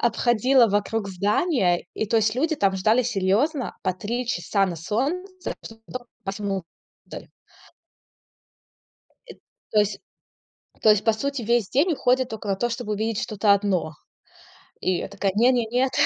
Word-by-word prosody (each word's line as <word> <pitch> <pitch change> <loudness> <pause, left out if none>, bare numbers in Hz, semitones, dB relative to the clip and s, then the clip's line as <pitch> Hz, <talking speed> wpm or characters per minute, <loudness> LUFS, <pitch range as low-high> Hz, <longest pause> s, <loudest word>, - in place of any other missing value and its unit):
обходила 240 +2 +3
вокруг 205 0 -1
здания. 195 - +1
И 220 - -2
то 225 - +1
есть 215 0 +2
люди 315 +4 0
там 195 -4 +2
ждали 220 +6 +3
серьёзно 240 - 0
по 185 - +1
3 235 +6 -3
часа 195 -1 0
на 175 - -3
солнце, 330 - -3
чтоб 225 0 -11
тока 250 -1 -7
попасть 200 -1 -6
внутрь. 195 -4 -7 2.1
Эт - - -16 0.3
то 215 - +4
есть 205 -1 0 0.8
то 215 - +6
есть 210 -1 +3
по 225 - +4
сути 275 +3 -3
весь 235 -2 +1
день 315 +7 +2
уходит 255 -2 +1
только 215 -2 -6
на 195 - +1
то, 240 +3 -1
чтобы 235 -3 -3
увидеть 220 +1 -2
что-то 205 -1 +2
одно. 195 -6 0 0.9
И 185 -1 +1
я - - -4
такая: 200 0 -1
не 235 +4 +5
не 240 -2 +1
нет. 250 +3 0
220 Hz, 155 wpm, -24 LUFS, 200-250 Hz, 2.1 s, то